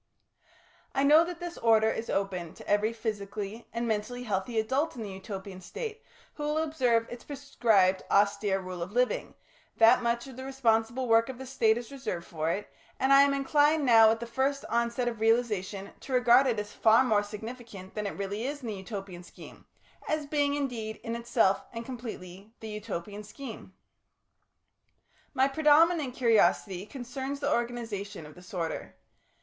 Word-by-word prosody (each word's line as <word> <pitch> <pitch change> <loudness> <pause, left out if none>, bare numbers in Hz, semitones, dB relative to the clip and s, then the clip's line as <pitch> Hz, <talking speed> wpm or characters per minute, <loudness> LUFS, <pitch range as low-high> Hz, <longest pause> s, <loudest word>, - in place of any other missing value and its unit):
I 275 - +2
know 300 +3 +7
that 350 -1 -6
this 350 -1 -6
order 220 -1 +4
is 225 - -5
open 185 -4 -2
to - - -13
every 210 +2 +2
physically 215 -1 -5
and 235 0 -2
mentally 225 +3 -2
healthy 215 +1 -1
adult 265 +8 0
in 230 - -5
the 205 - -6
Utopian 190 0 -8
State 455 - -6 0.3
who 295 - -7
will 300 +1 0
observe 255 -8 +1
its 240 - -8
prescribed 225 -10 +2
austere 200 -1 +2
rule 185 -2 -7
of 180 +4 -5
living, 250 +1 0 0.4
that 230 +3 +6
much 235 +1 0
of 265 -2 -11
the 260 - -6
responsible 245 -2 0
work 230 +1 +4
of 260 - -6
the 265 - -8
State 230 -4 +2
is 240 +1 -7
reserved 255 -11 -5
for 160 -2 -3
it, 200 +5 -2 0.3
and 265 +1 +4
I 275 - +9
am 280 0 +4
inclined 290 +2 +3
now 225 -3 +7
at 225 0 +1
the 235 - -5
first 265 +4 -1
onset 235 +1 0
of 230 -2 -3
realisation 215 -4 0
to 265 - -7
regard 250 +2 +5
it 235 -3 +1
as 210 0 -6
far 225 +3 +5
more 220 -5 +3
significant 210 -2 -9
than 210 -1 -3
it - - -6
really 200 +4 -3
is 290 +1 -5
in 235 - -4
the - - -3
Utopian 190 -2 -7
scheme, 175 - -14 0.4
as 310 -1 -1
being, 285 -1 +1
indeed, 235 -6 -3
in 230 0 -3
itself 235 -4 +2
and 230 0 -6
completely 220 -4 -8
the 220 - -7
Utopian 210 -2 -6
scheme. 220 -3 -10 1.6
My 265 0 +4
predominant 300 -1 +3
curiosity 210 -5 +2
concerns 265 +3 -5
the 285 +1 +1
organisation 225 -7 -3
of 150 - -12
this 180 0 -15
order. 170 -4 -4
230 Hz, 175 wpm, -29 LUFS, 205-265 Hz, 1.6 s, I